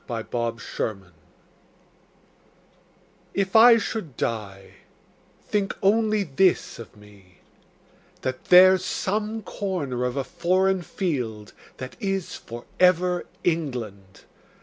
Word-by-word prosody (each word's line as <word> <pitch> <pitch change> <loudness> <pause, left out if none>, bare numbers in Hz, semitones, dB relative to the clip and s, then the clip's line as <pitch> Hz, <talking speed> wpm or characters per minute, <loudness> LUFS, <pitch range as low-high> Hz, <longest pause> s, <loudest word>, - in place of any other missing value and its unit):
The 115 -3 -4
Soldier 115 -5 -4 2.2
If 195 0 -1
I 230 +1 +9
should 205 - -5
die, 100 -4 -4 0.7
think 200 -2 -1
only 215 +1 +3
this 180 0 +1
of 110 -3 -11
me: 100 -3 -19 0.9
That 130 0 -4
there's 185 +1 +7
some 215 +3 -2
corner 155 -13 -3
of 125 +1 -2
a 135 - 0
foreign 185 +4 +1
field 125 - -4 0.2
That 130 0 -8
is 195 -3 -2
for 120 +1 -10
ever 180 -1 +3 0.2
England. 115 - -3
165 Hz, 100 wpm, -24 LUFS, 115-190 Hz, 2.2 s, I